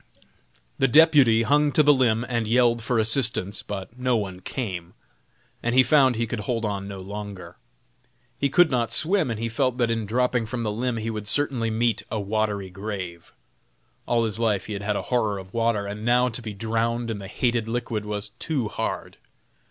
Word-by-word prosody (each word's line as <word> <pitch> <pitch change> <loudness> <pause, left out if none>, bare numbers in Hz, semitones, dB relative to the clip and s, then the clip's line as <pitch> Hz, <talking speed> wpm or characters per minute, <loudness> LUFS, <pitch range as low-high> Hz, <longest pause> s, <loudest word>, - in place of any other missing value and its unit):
The 135 - +4
deputy 135 -5 +6
hung 145 +3 +3
to 155 - +5
the 145 0 +6
limb 120 -3 +2
and 115 -3 -1
yelled 120 0 +3
for 120 +2 0
assistance, 110 -3 +1
but 105 +4 -7
no 125 -1 +2
one 95 -4 -4
came, 90 -6 -5 0.7
and 120 +1 -1
he 130 - +7
found 130 -1 +4
he 115 +1 0
could 115 0 -4
hold 115 +2 -2
on 100 -1 -3
no 100 -1 -7
longer. 100 -1 -8 0.8
He 140 - 0
could 175 +3 +4
not 120 -3 0
swim, 175 -2 +1
and 115 -2 -3
he 115 - -1
felt 125 +2 0
that 120 -2 +1
in 115 -2 -2
dropping 125 0 +1
from 120 +1 -3
the 105 - -1
limb 120 +2 -2
he 115 +1 -3
would 105 -1 -5
certainly 125 -1 0
meet 115 0 +1
a 110 - -2
watery 100 -2 -1
grave. 95 -4 -6 0.8
All 120 -1 +2
his 110 0 -1
life 110 -4 +1
he 105 - -5
had 100 - -4
had 105 +1 -1
a - - -2
horror 110 -4 +1
of 95 0 -10
water, 115 -3 +1
and 105 +1 -6
now 125 +2 +3
to 120 +1 -4
be 110 -3 -6
drowned 115 +2 -1
in 105 - -4
the 95 - -8
hated 120 +2 0
liquid 115 -2 -2
was 105 -1 -4
too 135 -9 -1
hard. - - -4
115 Hz, 200 wpm, -24 LUFS, 105-125 Hz, 0.8 s, he